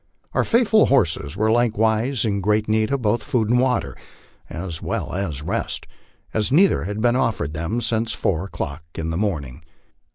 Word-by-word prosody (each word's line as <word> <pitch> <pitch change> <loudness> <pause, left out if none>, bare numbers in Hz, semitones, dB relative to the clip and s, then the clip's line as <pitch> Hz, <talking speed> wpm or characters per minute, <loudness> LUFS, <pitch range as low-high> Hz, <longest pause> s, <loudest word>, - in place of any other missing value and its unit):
Our - - +2
faithful 225 -2 +4
horses 85 - +3
were 110 +1 +2
likewise 115 +2 +1
in 100 -2 0
great 105 +2 +1
need 110 0 +1
of 140 -3 -1
both 110 +2 +1
food 110 0 0
and 125 - +4
water, 125 -2 0 0.5
as 85 -1 -6
well - - -3
as 85 -7 -3
rest, - - -3 0.5
as 110 +2 +1
neither 175 - +4
had 105 +2 -4
been 120 +1 +3
offered 110 - -1
them 85 +9 -2
since 115 -1 -1
four 90 0 -1
o'clock 80 -5 -5
in 80 0 -3
the - - -2
morning. 75 -9 -3
110 Hz, 170 wpm, -22 LUFS, 85-120 Hz, 0.5 s, faithful